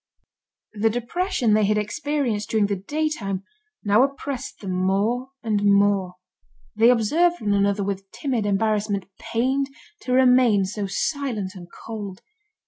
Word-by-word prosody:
The 215 +1 +2
depression 245 - 0
they 215 -1 +4
had 210 +1 +2
experienced 230 -1 -2
during 220 -2 +2
the 200 0 -1
daytime, 200 -4 -2 0.4
now 210 +2 +4
oppressed 275 -1 -3
them 195 -3 -5
more 200 +8 0
and 215 -3 0
more. 200 -2 +3 0.6
They 225 +2 +5
observed 315 +10 +3
one 205 -2 0
another 200 0 +2
with 195 0 -4
timid 245 -5 -2
embarrassment, 205 -1 0
pained 265 +4 0 0.3
to 255 - -5
remain 250 -5 +5
so 200 +1 -4
silent 230 -5 -2
and 180 -3 -10
cold. 205 -4 -8
215 Hz, 135 wpm, -23 LUFS, 200-255 Hz, 0.6 s, They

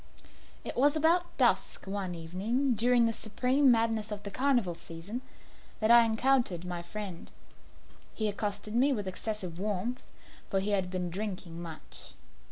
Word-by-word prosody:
It - - -5
was 285 +4 +4
about 340 +3 +2
dusk, - - +2
one 190 -2 -3
evening 205 +11 -1
during 240 +2 +4
the 230 - +1
supreme 255 +6 +2
madness 225 -2 +2
of 205 -1 -5
the 200 - -6
carnival 250 -7 +1
season, 170 +8 -7 0.6
that 215 +1 +3
I 235 -1 +8
encountered 225 -6 +2
my 175 -1 -4
friend. 185 -1 -7 0.9
He 215 - 0
accosted 205 0 -1
me 265 +4 +4
with 205 -5 -3
excessive 185 -2 -4
warmth, 210 +5 -2 0.5
for 195 - +1
he 200 +2 0
had 190 -3 +1
been 180 -1 -3
drinking 185 -3 -4
much. 165 -2 -9
210 Hz, 150 wpm, -30 LUFS, 185-240 Hz, 0.9 s, I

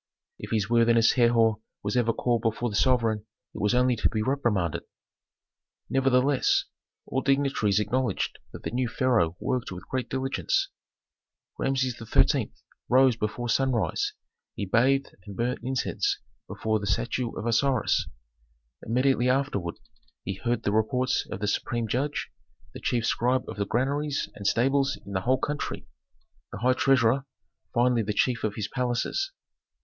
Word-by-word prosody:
If - - -7
his 105 -3 0
worthiness 115 0 +4
Herhor 115 -3 +3 0.2
was 105 +2 -2
ever 120 -2 +3
called 120 0 0
before 115 +1 -1
the - - -4
sovereign 110 -2 +2 0.3
it - - -6
was 105 +4 +2
only 125 0 +3
to - - +2
be 110 -1 -1
reprimanded. 110 - 0 1.1
Nevertheless, 135 0 +3 0.4
all 130 - -1
dignitaries 135 -7 +2
acknowledged 115 0 -1
that - - -10
the - - -3
new 125 +1 0
pharaoh 115 - +1
worked 125 -5 -2
with 90 0 -8
great 130 -1 -2
diligence. 130 - 0 0.9
Rameses 130 -2 0
XIII. 115 - +2 0.4
rose 130 -1 +5
before 115 +2 -3
sunrise, 125 -2 +1 0.4
he 100 - -3
bathed 130 +7 +2
and 100 - -8
burnt 120 +2 -1
incense 130 +1 -1 0.3
before 110 0 -1
the 100 - -5
statue 120 +4 -1
of 110 - -4
Osiris. 120 +1 +2 0.8
Immediately 125 +1 +2
afterward 125 -10 0 0.5
he 95 - -3
heard 120 +4 -2
the 100 - +1
reports 125 +4 +1
of 95 - -6
the 105 - 0
supreme 115 +2 -1
judge, 135 +7 -2 0.4
the - - -8
chief 120 -2 0
scribe 125 +3 +1
of - - -7
the 100 -1 -1
granaries 140 +2 -1
and 100 - -4
stables 135 +4 +2
in 100 - -9
the 95 -1 -1
whole 130 +6 +2
country, 145 +3 -3 0.7
the - - -6
high 125 +5 +3
treasurer, 135 0 +3 0.4
finally 120 0 +3
the 105 0 -2
chief 120 +2 +1
of 105 -2 -1
his 105 -3 -3
palaces. 125 - -1
120 Hz, 150 wpm, -27 LUFS, 110-130 Hz, 1.1 s, rose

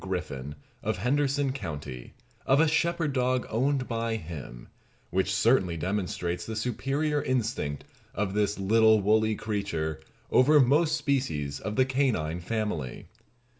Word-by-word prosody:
Griffin, 75 -7 -4 0.3
of - - -1
Henderson 140 +5 +1
county, 75 - -7 0.3
of 135 +2 +5
a 160 - +5
shepherd 160 -1 +1
dog 125 -1 +1
owned 130 +3 +1
by 115 -1 -1
him, 75 - -8 0.4
which 95 +1 +1
certainly 95 -3 +2
demonstrates 90 -1 -2
the 110 - -5
superior 135 +6 -1
instinct 110 - -2 0.3
of 95 0 -1
this 105 0 +1
little 110 +2 +4
woolly 110 +2 +2
creature 100 -8 -3 0.3
over 150 +4 +6
most 150 +4 +4
species 125 - -1
of 105 - -4
the 130 - +4
canine 125 - 0
family. 90 - -3
110 Hz, 130 wpm, -28 LUFS, 90-130 Hz, 0.4 s, over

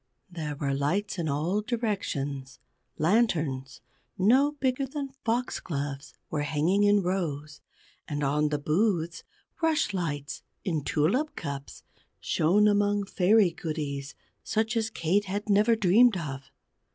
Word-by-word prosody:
There 155 -4 -4
were 140 -1 -1
lights 175 +9 -1
in 160 -2 -1
all 165 +9 0
directions 145 - -3 0.4
lanterns 155 - +1 0.4
no 260 +10 +4
bigger 270 -1 -1
than 275 0 -5
Foxgloves 145 - -3 0.2
were 150 - -1
hanging 155 +7 +1
in 205 -1 +4
rows; 155 -5 -3 0.5
and 145 -1 -3
on 150 +2 +1
the 150 - 0
booths, 170 +2 0 0.4
rushlights 180 - -1 0.2
in 160 -6 -1
tulip 185 - +1
cups 140 -3 -6 0.4
shone 200 +7 +3
among 205 0 +2
Fairy 195 0 +4
goodies 150 -4 -4 0.3
such 220 +1 0
as 225 -1 0
Kate 200 0 0
had 205 +2 -4
never 215 +3 +4
dreamed 215 +2 +5
of. 135 -5 -6
175 Hz, 120 wpm, -28 LUFS, 145-210 Hz, 0.5 s, dreamed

